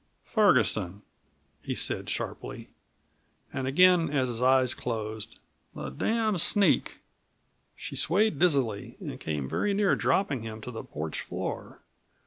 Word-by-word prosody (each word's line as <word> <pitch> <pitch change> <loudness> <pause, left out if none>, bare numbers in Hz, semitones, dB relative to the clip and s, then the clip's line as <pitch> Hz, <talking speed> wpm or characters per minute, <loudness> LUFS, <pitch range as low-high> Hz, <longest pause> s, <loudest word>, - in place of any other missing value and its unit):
"Ferguson," 105 - +2 0.6
he - - -4
said - - -1
sharply. - - -5 0.8
And 130 - -2
again, 180 +4 +5
as 135 -3 0
his 120 0 -2
eyes 130 -1 +4
closed: 110 -2 -5 0.4
"The 70 - -5
damned 215 - 0
sneak." 200 -2 +3 0.7
She - - -7
swayed 195 -2 +2
dizzily 135 - +1
and - - -7
came 75 -4 -3
very 200 - 0
near 200 -1 +3
dropping 145 - +1
him 110 -1 -7
to 125 - -7
the 115 - -7
porch 75 +1 -5
floor. - - -6
130 Hz, 125 wpm, -28 LUFS, 110-185 Hz, 0.8 s, again